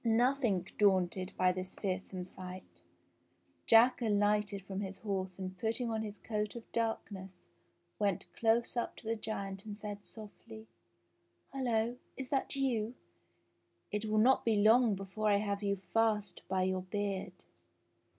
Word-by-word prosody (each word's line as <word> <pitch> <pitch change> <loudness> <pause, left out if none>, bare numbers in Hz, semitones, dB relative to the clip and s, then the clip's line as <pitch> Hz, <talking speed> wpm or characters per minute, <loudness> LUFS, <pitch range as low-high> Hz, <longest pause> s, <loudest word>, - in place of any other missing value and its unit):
Nothing 235 -4 +2
daunted 185 -2 +3
] - - -29
by 185 0 +4
this 185 +1 -5
fearsome 185 -1 -3
sight, 180 - -10 0.9
Jack 245 +3 +6
alighted 205 -2 +2
from 195 0 -4
his 195 -1 -5
horse 190 -3 -3
and 185 -1 -4
i 180 - -26
putting 230 +1 0
on 220 -1 -1
his 210 -1 -5
coat 210 -1 -3
of 235 - -6
darkness 200 -5 -3 0.6
went 200 -3 +1
close 230 +1 +2
up 235 - -1
to - - -12
the 225 - +1
giant 200 -3 -4
and; 210 -1 -7
said 205 -1 -6
softly: 220 0 -11 0.9
"Hullo! 240 -3 0 0.2
is 265 -2 -5
that 275 -1 0
you.? 245 -4 0 1.0
It 210 +1 -1
will 215 0 +1
not 250 +5 +5
be 225 -2 +3
long 220 +1 +5
before 195 +3 -2
I 200 - +5
have 200 -1 -1
you 200 -1 +1
fast 210 +3 0
by 190 -1 +1
your 185 0 0
beard." 190 -1 -3
210 Hz, 150 wpm, -34 LUFS, 190-225 Hz, 1.0 s, Jack